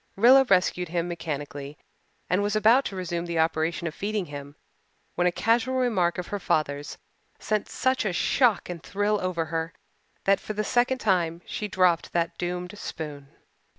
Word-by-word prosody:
Rilla 255 +6 +7
rescued 180 -4 +2
him 170 0 -1
mechanically 145 -4 -5 0.5
and 180 +3 +1
was 205 +1 0
about 225 +5 +5
to 195 - -4
resume 175 -2 -3
the 170 -1 -2
operation 160 0 0
of 165 - -3
feeding 205 +2 -2
him 145 -1 -9 0.6
when 180 - +2
a - - +3
casual 235 +6 +1
remark 215 -10 +1
of 180 - -5
her 205 - -3
father's 145 -4 -1 0.4
sent 215 -2 -2
such 260 +1 0
a 210 - 0
shock 235 +5 +2
and 175 -2 -6
thrill 205 +3 0
over 180 -3 -1
her 165 0 -2 0.5
that 195 0 +3
for 215 - -6
the 215 0 -1
second 245 +3 +2
time 175 -7 0
she 210 - -4
dropped 180 -4 +2
that 170 -1 0
doomed 180 +2 -3
spoon. 145 -3 -6
180 Hz, 170 wpm, -26 LUFS, 165-210 Hz, 0.6 s, Rilla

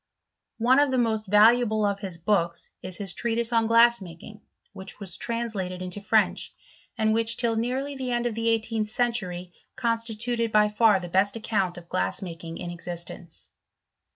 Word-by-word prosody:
One 250 +4 +4
of 290 -1 +3
the 260 - 0
most 220 -3 0
valuable 215 +1 +4
of 200 -1 -1
his 190 -4 -5
books, 170 -1 -1
is 185 -2 -4
his 195 -3 -3
treatise 235 +3 -1
on 225 -1 +3
glass 235 0 +5
making, 185 +4 -11 0.3
which 190 +1 -10
was 195 -3 -3
translated 220 -6 -3
into 185 +2 -4
French; 200 - +1 0.5
and 220 -1 +2
which, 225 0 +3
till 235 -2 +1
nearly 255 +5 -2
the 260 -2 -4
end 240 0 0
of 240 - -1
the 230 +1 0
eighteenth 225 -1 -1
century, 190 -7 -1 0.2
constituted 230 0 -1
by 210 0 +4
far 210 -1 +4
the 175 - -7
best 190 +4 +1
account 195 -5 -1
of 170 -1 -11
glass 90 - -1
making 165 -2 -7
in 175 - -6
existence. 170 -1 -7
215 Hz, 170 wpm, -26 LUFS, 185-230 Hz, 0.5 s, glass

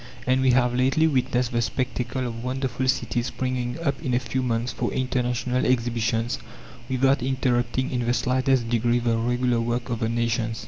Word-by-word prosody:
And 130 +1 +2
we 130 - +3
have 125 -1 +3
lately 130 +5 +3
witnessed 125 -4 +1
the 120 -1 +1
spectacle 125 +1 -2
of 115 -1 -5
wonderful 130 0 -2
cities 120 -1 0
springing 125 0 -2
up 140 -2 -1
in 130 -6 0
a - - +3
few 130 +1 -2
months 120 -1 -1
for - - -2
international 125 -1 0
exhibitions, 115 -1 0 0.5
without 135 +1 +2
interrupting 130 -1 0
in 120 -2 -1
the 120 - +3
slightest 130 -1 +1
degree 120 +1 +2
the 120 -1 +1
regular 120 +1 +1
work 120 +1 -2
of 120 - -1
the 115 -2 0
nations. 115 -1 -1
125 Hz, 175 wpm, -25 LUFS, 120-130 Hz, 0.5 s, we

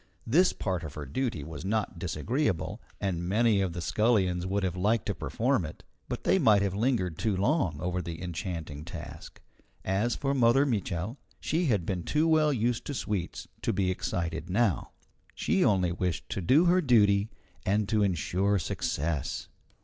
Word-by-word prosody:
This 170 +11 +4
part 90 -4 -3
of 75 -2 -7
her 75 - -5
duty 90 - -2
was 80 +2 -7
not 100 -3 -1
disagreeable, 95 - -1 0.2
and 95 -4 -1
many 110 0 +3
of 95 -3 -1
the 85 - -4
scullions 95 -3 +2
would 100 +1 0
have 90 -2 -1
liked 105 +5 +1
to 105 - -1
perform 110 - 0
it. 75 - -8 0.3
But - - -4
they 190 - +3
might 105 - +5
have 100 -2 0
lingered 100 - 0
too 105 -4 0
long 100 - +1
over 90 +1 -1
the 85 -1 -6
enchanting 85 -4 -5
task. 80 -2 -9 0.5
As 100 +6 +1
for 140 -1 -1
Mother 130 +1 +4
Mitchel, 105 - -2 0.2
she 170 +4 0
had 105 -9 +1
been 90 -1 -2
too 150 - +1
well 155 -2 +4
used 120 -2 0
to 145 - -4
sweets 100 -7 -3
to - - 0
be 95 -1 +1
excited 85 -2 -3
now. 100 0 +1 0.5
She - - +1
only 95 -4 +3
wished 90 -1 -2
to - - -3
do 140 - +4
her 180 +1 +4
duty 105 - +4 0.3
and 100 +1 +1
to 110 -2 +2
insure 95 +2 +1
success. 80 -4 -2
100 Hz, 170 wpm, -29 LUFS, 85-115 Hz, 0.5 s, might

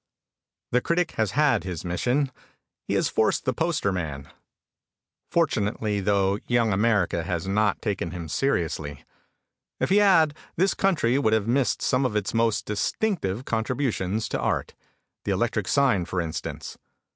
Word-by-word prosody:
The 125 - +3
critic 170 +3 0
has 110 -3 -1
had 145 -6 +3
his 90 -2 -5
mission. 125 +10 0 0.6
He - - 0
has - - +2
forced - - +1
the - - +1
Poster 100 - 0
man. 75 -7 -4 1.0
Fortunately 110 -9 0
though 100 0 +1
young 115 -3 +2
America 100 -4 +2
has 85 +1 -3
not 105 +2 +1
taken 100 -6 -2
him 85 -1 -6
seriously. 80 - -2 0.7
If - - 0
he 200 - +5
had 185 -7 +5 0.2
this 190 +4 +2
country 140 -10 +2
would 110 -6 +2
have 110 -1 +1
missed 130 +2 +1
some 130 +1 +2
of 125 -5 -1
its 105 -2 -1
most 115 -1 +1
distinctive 110 - -1
contributions 110 -3 -1
to - - -2
Art. - - -1 0.5
The - - 0
electric - - -1
sign 130 -11 +2
for 90 +1 -3
instance. 80 -2 -5
110 Hz, 145 wpm, -25 LUFS, 95-135 Hz, 1.0 s, he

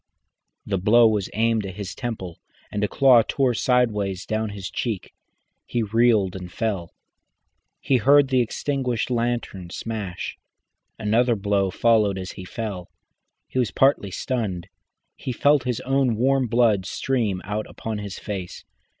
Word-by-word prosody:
The 95 -2 -1
blow 115 +5 +6
was 105 -3 0
aimed 115 0 +1
at 95 -2 -7
his 100 -1 -5
temple, 105 -9 -5 0.3
and 105 - -2
a - - +3
claw 130 0 +6
tore 130 +2 +1
sideways 105 -6 +1
down 110 0 -1
to 105 - -7
his 95 -2 -6
cheek. 110 -7 -3 0.5
He 120 - -1
reeled 110 -3 +2
and 90 -2 -7
fell, 105 -3 -1
and - - -22 0.9
he 135 - +2
heard 140 +3 +5
the 130 -2 +3
extinguished 125 0 -2
lantern 120 -7 -2
smash. 105 -3 -5 0.6
Another 115 +3 +2
blow 100 -1 +1
followed 105 -1 +2
as 95 -1 -5
he 95 - -9
fell. 100 -3 -5 0.6
He 130 - -2
was 125 - +1
partly 135 -7 +2
stunned, 95 -5 -3 0.5
he 130 - -5
felt 140 +1 +3
his 125 -3 -1
own 135 -3 +1
warm 130 +2 +2
blood 110 -5 +2
stream 115 -8 -1
out 105 +2 -3
upon 110 -2 -5
his 100 -2 -6
face. 95 -4 -6
110 Hz, 150 wpm, -24 LUFS, 100-125 Hz, 0.9 s, blow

